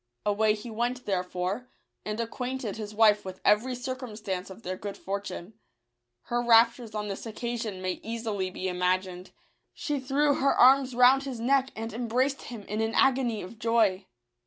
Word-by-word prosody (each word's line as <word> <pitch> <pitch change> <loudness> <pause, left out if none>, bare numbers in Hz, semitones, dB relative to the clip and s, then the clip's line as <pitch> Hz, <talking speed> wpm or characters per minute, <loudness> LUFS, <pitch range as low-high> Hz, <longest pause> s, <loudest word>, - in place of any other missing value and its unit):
Away 210 +1 +3
he 225 +2 -8
went 240 +3 -2
therefore, 185 +4 -2 0.4
and 210 +1 -4
acquainted 245 -1 -3
his 215 -1 -7
wife 210 -1 +5
with 185 -1 -8
every 225 +5 +3
circumstance 225 -7 -5
of 190 +4 -12
their 185 +1 -3
good 200 +1 -7
fortune. 200 0 -5 0.7
Her 240 0 -1
raptures 235 -1 +4
on 210 0 -2
this 200 +3 -5
occasion 225 -3 -4
may 185 -1 -2
easily 220 -4 -3
be 185 0 -4
imagined; 180 0 -1 0.5
she 295 -3 -2
threw 285 +3 +2
her 275 - +3
arms 260 0 +5
round 250 +2 +6
his 260 -4 -5
neck 265 +3 +2
and 225 0 -5
embraced 250 +4 0
him 230 -4 -8
in 210 +2 -3
an 220 0 -1
agony 250 -5 +2
of 215 +5 -11
joy. 215 -5 +2
225 Hz, 160 wpm, -28 LUFS, 200-250 Hz, 0.7 s, round